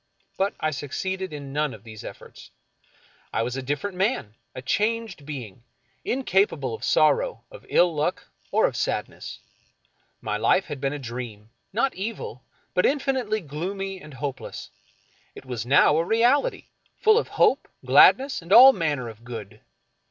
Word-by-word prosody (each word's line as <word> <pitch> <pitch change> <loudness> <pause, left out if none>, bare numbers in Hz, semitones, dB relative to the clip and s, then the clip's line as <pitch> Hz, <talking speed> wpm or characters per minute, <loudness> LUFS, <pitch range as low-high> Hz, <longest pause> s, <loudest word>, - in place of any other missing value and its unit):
But 195 +1 0
I 155 - 0
succeeded 185 +6 -4
in 140 -2 -7
none 150 -1 -1
of - - -16
these 110 -2 -10
efforts. - - -11 0.8
I 110 - 0
was 125 +2 -3
a 135 - -3
different 145 +9 -3
man, 190 - -1 0.2
a 130 - -6
changed 215 - -1
being, 120 -7 -7 0.4
incapable 190 - +1
of 110 - -7
sorrow, - - +2
of - - -13
ill 175 -1 +4
luck, 150 0 -1 0.2
or - - +3
of - - -1
sadness. - - -3 0.8
My 105 - -2
life 185 - +3
had 145 -4 -7
been 135 - 0
a 145 - -4
dream, 115 -4 -7 0.2
not 250 +6 +1
evil, 195 - -5 0.3
but 180 - +2
infinitely 260 -6 0
gloomy 190 +5 -5
and 150 -5 -12
hopeless. 135 +1 -6 0.6
It - - -11
was 120 -2 -5
now 140 +2 +5
a 165 - +2
reality, 240 - +2 0.3
full 435 -1 +5
of - - -4
hope, - - +3 0.2
gladness, 270 -3 +5
and 170 +2 -12
all 260 +5 +10
manner 150 - -1
of 115 0 -11
good. 115 -5 -8
155 Hz, 155 wpm, -25 LUFS, 130-210 Hz, 0.8 s, all